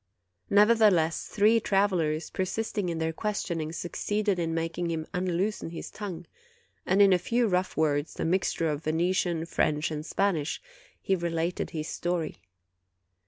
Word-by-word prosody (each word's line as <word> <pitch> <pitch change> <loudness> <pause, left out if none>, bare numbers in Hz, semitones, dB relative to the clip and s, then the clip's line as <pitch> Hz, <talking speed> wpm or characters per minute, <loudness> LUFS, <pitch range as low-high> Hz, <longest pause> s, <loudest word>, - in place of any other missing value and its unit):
Nevertheless, 205 -6 +4
three 220 +2 +4
travelers, 180 -7 +1
per 190 - -1
sisting 205 -1 -2
in 165 - -2
their 160 0 -1
questioning, 170 -5 -2
succeeded 200 +3 -1
in 165 -1 -1
making 165 +1 -2
him 160 -1 -2
unloosen 180 +1 -1
his 165 - -7
tongue; 180 -5 -6 0.6
and 195 +2 +5
in 195 -1 +6
a 180 - +3
few 235 +6 +1
rough 185 -1 0
words, 150 -1 0
a - - 0
mixture 170 -1 +1
of 150 0 -2
Venetian, 170 +1 +1
French, 155 -2 0
and 150 -1 -4
Spanish, 170 -3 0 0.4
he 195 - +1
related 170 0 -2
his 155 -1 -4
story. 175 -2 -2
175 Hz, 145 wpm, -28 LUFS, 160-195 Hz, 0.6 s, in